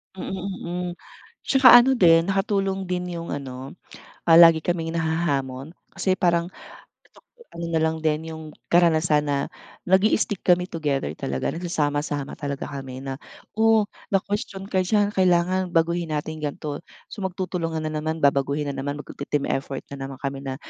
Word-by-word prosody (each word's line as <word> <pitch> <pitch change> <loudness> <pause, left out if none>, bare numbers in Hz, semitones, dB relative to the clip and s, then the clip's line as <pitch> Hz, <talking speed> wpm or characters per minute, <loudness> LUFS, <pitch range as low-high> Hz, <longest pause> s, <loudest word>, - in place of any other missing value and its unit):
Mm, 190 - -6 0.4
mm. 180 +1 -3 0.6
Tsaka 265 -1 +7
ano 245 +2 +8
din 165 -4 +5
nakatulong 195 -1 0
din 180 -1 -3
yung 170 0 -6
ano 135 -1 -6 0.5
ah, 165 -1 +7
lagi 165 -2 +7
kaming 165 -1 -2
nahahamon. 155 -3 -2 0.2
Kasi 185 -1 0
parang 170 -2 +1 1.0
ano 170 - -6
na 160 -1 +1
lang 160 0 0
din 155 +1 0
yung 160 0 -8 0.3
karanasan 160 -3 +3
na 140 -1 +1 0.5
nag-i-stick 195 +1 +2
kami 180 0 +3
together 145 - -1
talaga 65 0 -2
nagsasama-sama 145 -4 -2
talaga 140 -1 -4
kami 135 -2 -7
na 135 0 -5 0.4
o 220 -1 +4 0.3
na-kwestyun 195 0 -2
ka 190 - +2
diyan 205 +2 +2
kailangan 185 0 +2
baguhin 165 0 +1
natin 155 +1 -4
ganto. 145 0 -4 0.3
So 210 - -7
magtutulungan 175 -4 -3
na 155 - -3
naman, 155 +1 -3
babaguhin 140 +1 +2
na - - -8
naman, 140 +2 -3
magte-team 145 0 -4
effort 135 0 -3
na 140 - -6
naman 135 - -8
kami 135 0 -3
na, 135 -1 -4
165 Hz, 150 wpm, -24 LUFS, 145-180 Hz, 1.0 s, ano